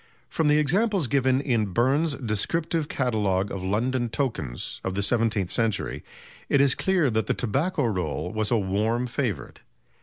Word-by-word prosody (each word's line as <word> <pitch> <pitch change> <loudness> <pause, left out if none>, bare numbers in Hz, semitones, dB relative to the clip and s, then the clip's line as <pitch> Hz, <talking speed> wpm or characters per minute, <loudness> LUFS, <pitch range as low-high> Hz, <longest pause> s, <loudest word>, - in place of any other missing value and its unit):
From 160 - 0
the 150 0 +4
examples 190 +5 +2
given 130 0 +2
in 115 -8 0
Burn's 140 - +2
"Descriptive 150 +8 -1
Catalogue 105 -7 0
of 100 - -4
London 120 +6 0
Tokens" 110 - -3
of 95 - -3
the 100 - 0
seventeenth 110 -4 +1
century, 115 -3 -1 0.5
it 140 - +4
is 140 -2 +4
clear 180 -9 +1
that 110 0 0
the - - +1
"Tobacco 140 - 0
Roll" 90 -4 -2
was 110 -1 0
a 120 - +3
warm 110 +5 0
favourite. 120 -4 -3
120 Hz, 155 wpm, -25 LUFS, 105-140 Hz, 0.5 s, the